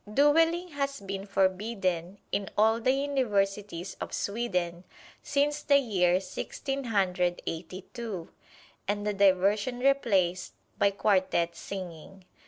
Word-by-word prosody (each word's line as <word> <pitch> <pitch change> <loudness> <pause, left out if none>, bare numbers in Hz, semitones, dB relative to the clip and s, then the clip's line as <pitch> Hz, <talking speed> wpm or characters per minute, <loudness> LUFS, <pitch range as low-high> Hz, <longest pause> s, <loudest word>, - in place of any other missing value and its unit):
Dueling 325 +7 +3
has 280 -2 -2
been 195 0 -6
forbidden 190 -2 0
in 200 -1 -1
all 220 +2 +4
the 255 - +3
universities 205 -9 -1
of - - -5
Sweden 180 -6 -2 0.4
since 290 +1 0
the 285 -1 +5
year 185 -9 +2
Sixteen 270 +7 -4
Hundred 180 -5 +1
Eighty 180 +3 -5
two, 215 -8 -6 0.6
and 205 +1 -1
the 210 - 0
diversion 200 +4 +3
replaced 205 -10 +1 0.3
by 200 - +5
quartet 185 -4 +1
singing. 185 0 -8
200 Hz, 115 wpm, -29 LUFS, 185-245 Hz, 0.6 s, the